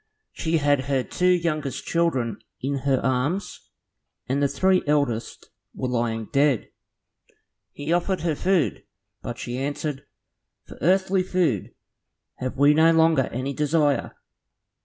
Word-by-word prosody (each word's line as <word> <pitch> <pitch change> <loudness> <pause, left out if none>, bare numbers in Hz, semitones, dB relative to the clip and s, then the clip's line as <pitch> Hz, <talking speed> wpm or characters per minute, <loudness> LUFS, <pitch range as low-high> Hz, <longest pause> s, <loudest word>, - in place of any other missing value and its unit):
She 165 0 -1
had 145 -3 +2
her 135 -2 0
two 180 - -1
youngest 155 -6 0
children 130 -11 0 0.2
in 135 +2 -2
her 130 -2 +3
arms, 135 +9 -2 0.6
and 135 +3 0
the 140 - +4
three 185 +5 +2
eldest 140 -6 -1 0.2
were 130 - -3
lying 115 -2 -1
dead. 140 -4 +2 1.0
He 145 +3 -3
offered 180 +2 0
her 165 -1 0
food, 180 0 0 0.4
but 120 - -6
she 125 +1 -5
answered, 145 0 -4 0.6
"For - - -13
earthly 190 +4 +3
food 180 - -1 0.6
have 130 +1 -4
we 145 +2 +6
no 160 +2 +5
longer 160 -4 +4
any 130 +4 -4
desire. 150 -2 +1
145 Hz, 130 wpm, -24 LUFS, 130-165 Hz, 1.0 s, we